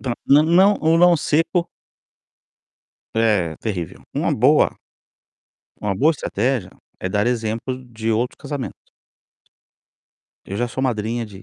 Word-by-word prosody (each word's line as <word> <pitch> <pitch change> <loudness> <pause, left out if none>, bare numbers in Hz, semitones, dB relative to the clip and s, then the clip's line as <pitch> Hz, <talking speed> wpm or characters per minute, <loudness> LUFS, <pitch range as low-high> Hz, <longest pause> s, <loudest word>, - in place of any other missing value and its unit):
Dã 125 -3 -2 0.2
o 145 +2 +7
não 185 +6 +5
o 160 +1 +4
não 175 0 +6
seco 165 +3 0 1.5
É, 105 -8 +1
terrível. 90 -8 -5
Uma - - 0
boa - - +4 1.1
uma 100 -1 -1
boa 155 +8 +4
estratégia 120 -6 -2 0.3
é 95 - -2
dar 100 +3 0
exemplo 120 +2 -2
de 115 0 -2
outro 120 +3 -1
casamento. 145 -4 -5 1.7
"Eu 100 - -6
já 120 - 0
sou 130 - -4
madrinha 115 -1 -1
de 100 -1 -13
120 Hz, 125 wpm, -21 LUFS, 105-145 Hz, 1.7 s, o